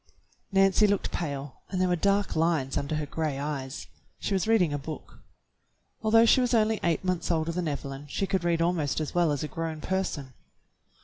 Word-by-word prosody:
Nancy 195 +1 +4
looked 200 -1 0
pale 140 -4 -4
and 185 - -2
there 185 - +3
were 180 - +2
dark 200 +3 +1
lines 160 -5 +1
under 140 +2 -1
her 155 -1 -2
gray 150 -1 -2
eyes. 140 -1 -4 0.3
She - - -3
was 190 +2 0
reading 190 -9 +3
a 145 - -1
book. 155 +3 -8 0.8
Although 225 +1 +5
she 255 - +5
was 245 -1 +2
only 220 -1 +2
eight 170 0 +1
months 180 -2 -1
older 165 -1 +1
than 175 0 -2
Evelyn 140 -1 -5
she 195 +7 -1
could 190 -2 -1
read 170 -1 +2
almost 165 -5 0
as 155 - -3
well 175 -3 +3
as 145 +1 -1
a - - -2
grown 160 +2 -4
person. 155 -7 -3
165 Hz, 195 wpm, -28 LUFS, 145-190 Hz, 0.8 s, Although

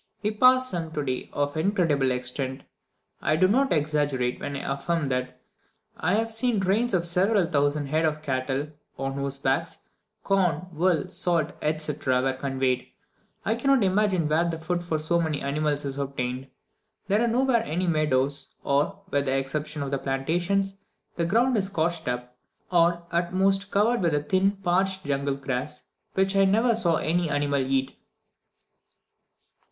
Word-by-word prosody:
We 210 - +1
passed 255 +3 +4
some 165 -2 -3
today 140 -5 -3
of 145 +1 -1
incredible 160 -6 +1
extent. 130 +1 -3 0.6
I 155 - +2
do 185 +4 +4
not 265 +7 +2
exaggerate 145 -5 0
when 140 0 -4
I 135 0 -2
affirm 155 +1 -1
that 130 0 -3 0.6
I 180 +4 0
have 225 +1 0
seen 225 -1 0
trains 195 +4 +1
of 175 -1 +1
several 185 +3 +3
thousand 145 -1 +1
head 155 +3 +1
of 155 -1 -1
cattle, 135 +1 -2 0.3
on 135 0 -3
whose 140 0 -3
backs, 135 +5 -1 0.5
corn, 180 -4 +1
wool, 170 -1 +1
salt, 165 -3 0
etc., 150 -4 0
were 135 0 +1
conveyed. 130 -1 -1 0.6
I 220 - +2
cannot 265 +1 +2
imagine 190 -3 +2
where 165 +3 +2
the 165 - -3
food 175 +2 -2
for 165 -2 -1
so 170 +3 +1
many 155 -3 -1
animals 145 +1 -1
is 140 0 -4
obtained; 130 -1 -3 0.6
there 205 +3 +2
are 235 - +2
nowhere 240 0 +2
any 180 -3 -2
meadows, 145 -4 +1
for, 150 +9 0
with 140 0 +1
the 135 0 +1
exception 150 +2 -3
of 140 - -5
the 140 - 0
plantations, 175 +9 -1 0.4
the 170 - 0
ground 235 +8 +2
is 195 -2 0
scorched 170 -4 -1
up, 125 0 -4 0.4
or 170 0 +3
at 175 +1 -1
most 195 +1 +2
covered 220 +4 +2
with 150 -4 0
thin, 195 +1 +3
parched, 190 +1 +1
jungle 140 0 -1
grass, 135 +2 -4 0.3
which 190 +1 +2
I 195 0 +5
never 225 +5 +3
saw 175 -7 +2
any 165 +1 0
animal 145 -1 +1
eat. 135 0 -1
160 Hz, 160 wpm, -26 LUFS, 140-190 Hz, 0.6 s, I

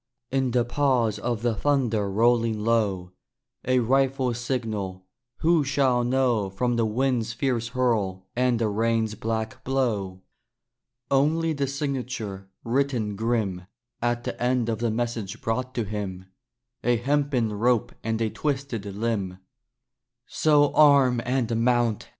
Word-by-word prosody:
In 135 -1 +1
the 120 -1 +1
pause 120 -5 +1
of 120 -1 -2
the 120 -1 +2
thunder 115 -4 +1
rolling 115 +2 +2
low, 105 -5 0 0.5
A 130 +1 +2
rifle's 130 -1 +1
signal 110 -7 -3 0.4
who 165 -1 +4
shall 135 -3 +2
know 120 -5 +1
From 120 +6 -1
the 115 -1 +1
wind's 115 0 0
fierce 120 -3 -1
hurl 110 -7 0
and 125 -1 +2
the 115 -1 +1
rain's 110 +1 0
black 110 +3 -4
blow? 105 -9 -1 0.9
Only 160 +4 +2
the 140 -2 -1
signature, 125 -8 -4
written 120 -4 0
grim 105 -5 -1 0.3
At 120 0 0
the - - -5
end 125 -1 +1
of 110 -1 -1
the 120 0 0
message 115 -2 -3
brought 125 +3 -2
to 120 - 0
him 100 -3 -5 0.6
A 120 0 +3
hempen 135 -3 0
rope 115 +2 +1
and 115 0 -1
a 110 -2 0
twisted 140 -7 -3
limb. 100 -2 -2 0.9
So 145 -2 +3
arm 140 -5 +5
and 125 -2 0
mount! 120 -3 +1
120 Hz, 130 wpm, -25 LUFS, 110-130 Hz, 0.9 s, arm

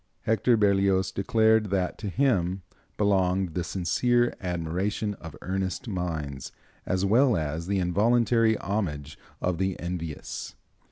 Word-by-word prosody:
Hector 115 +2 +2
Berlioz 100 -2 +2
declared 110 +2 +2
that 95 -2 -1
to 105 - -4
him 95 -7 +1 0.3
belonged 95 -3 +1
"the 90 - -1
sincere 120 +8 +1
admiration 90 +4 -2
of 80 - -9
earnest 95 +3 -3
minds, 80 - -4 0.4
as 95 +1 +1
well 120 +2 +4
as 80 +2 -3
the 100 0 0
involuntary 110 +5 +3
homage 75 -8 -3 0.2
of 90 -2 -1
the 95 0 -1
envious." 85 -4 -5
95 Hz, 120 wpm, -27 LUFS, 90-105 Hz, 0.4 s, well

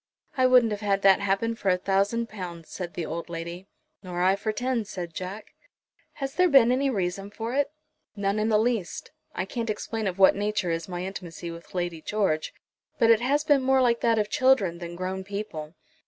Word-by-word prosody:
"I 260 -2 +4
wouldn't 250 -3 +5
have 205 0 -3
had 200 -1 0
that 195 -1 +6
happen 200 +3 0
for 215 -4 -2
a 180 - +3
thousand 200 +5 0
pounds," 175 -6 -8
said 175 -2 -6
the 170 - -3
old 170 +2 -5
lady. 170 +2 -6 0.3
"Nor 180 -2 -3
I 190 +1 +4
for 215 +2 -2
ten," 245 +1 -1
said 180 -5 -6
Jack. 185 +5 -7 0.6
"Has 275 -2 -4
there 360 +2 +3
been 260 -5 +6
any 270 +2 +2
reason 195 -3 -2
for 225 +3 -5
it?" 280 +1 +1 0.5
"None 200 0 0
in 215 +1 +1
the 215 - +4
least. 220 -4 -1 0.2
I - - -1
can't 230 +3 -4
explain 215 0 -2
of 185 -1 -3
what 190 -1 +6
nature 205 -3 -1
is 165 +2 -3
my 175 0 -4
intimacy 175 -3 -6
with 170 +2 -12
Lady 175 -2 -2
George, 190 -5 0 0.5
but 230 0 +5
it 225 0 +5
has 285 +4 +2
been 290 -3 +4
more 265 0 +3
like 240 -2 +3
that 230 -1 +3
of 210 -1 +1
children 210 -9 +2
than 175 -1 -7
grown 185 +1 -3
people." 190 -6 -6
200 Hz, 205 wpm, -26 LUFS, 180-230 Hz, 0.6 s, that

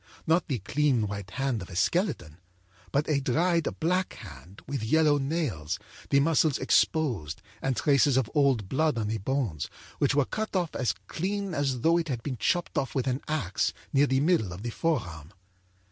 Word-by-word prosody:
Not 165 +1 +2
the 135 - -1
clean 130 +2 +1
white 100 -2 -6
hand 130 0 -1
of 90 - -8
a 90 - -9
skeleton, 95 - 0 0.5
but 140 +2 +1
a 150 -3 +2
dried 165 +5 +1
black 180 +3 0
hand, 90 - -12
with 140 -2 -3
yellow 150 +4 +3
nails, 135 - -2 0.3
the 140 - +4
muscles 155 -1 +3
exposed 105 - +1 0.2
and 135 -1 0
traces 140 +1 +3
of 130 -4 +2
old 135 -9 +2
blood 150 +3 +1
on 105 -2 -1
the 110 0 -2
bones, 105 - -2 0.3
which 145 -1 +2
were 145 -2 +3
cut 215 +5 -4
off 175 -4 0
as 125 - 0
clean 195 +2 -3
as 135 -5 -1
though 165 +4 +4
it 165 - -3
had 125 -5 -3
been 135 -4 -3
chopped 175 - 0
off 135 - -4
with 130 -2 0
an 130 +1 -1
axe, 140 -12 0 0.2
near 140 +1 +4
the 130 0 +2
middle 150 - +2
of 90 +4 -8
the 120 - -3
forearm. 90 - -2
135 Hz, 185 wpm, -28 LUFS, 110-155 Hz, 0.5 s, the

